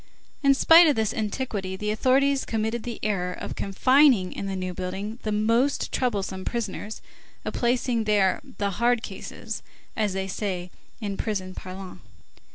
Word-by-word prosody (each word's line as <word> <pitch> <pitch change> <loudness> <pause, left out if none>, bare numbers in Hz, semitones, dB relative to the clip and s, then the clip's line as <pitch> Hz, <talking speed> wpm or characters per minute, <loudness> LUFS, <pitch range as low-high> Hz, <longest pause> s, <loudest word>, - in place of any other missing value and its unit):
In 275 -1 +5
spite 330 +4 +8
of 295 - +4
this 220 -2 0
antiquity, 210 -3 -3
the 210 +2 -2
authorities 265 +5 +3
committed 225 +1 -1
the 235 0 -6
error 180 -4 0
of - - -6
confining 250 0 +4
in 200 - -4
the 195 - -2
New 185 -1 -3
Building 190 +5 -5
the 215 - -2
most 230 +6 +1
troublesome 200 -6 -1
prisoners, 220 -2 -4 0.4
of - - -3
placing 240 -1 +1
there 205 -3 +3 0.2
"the 200 -1 0
hard 235 +4 +2
cases," - - -6 0.3
as 210 -3 0
they 190 0 -2
say 185 -2 -3 0.3
in 200 -2 -3
prison 190 -4 -3
parlance. 185 0 -8
215 Hz, 155 wpm, -26 LUFS, 190-240 Hz, 0.4 s, spite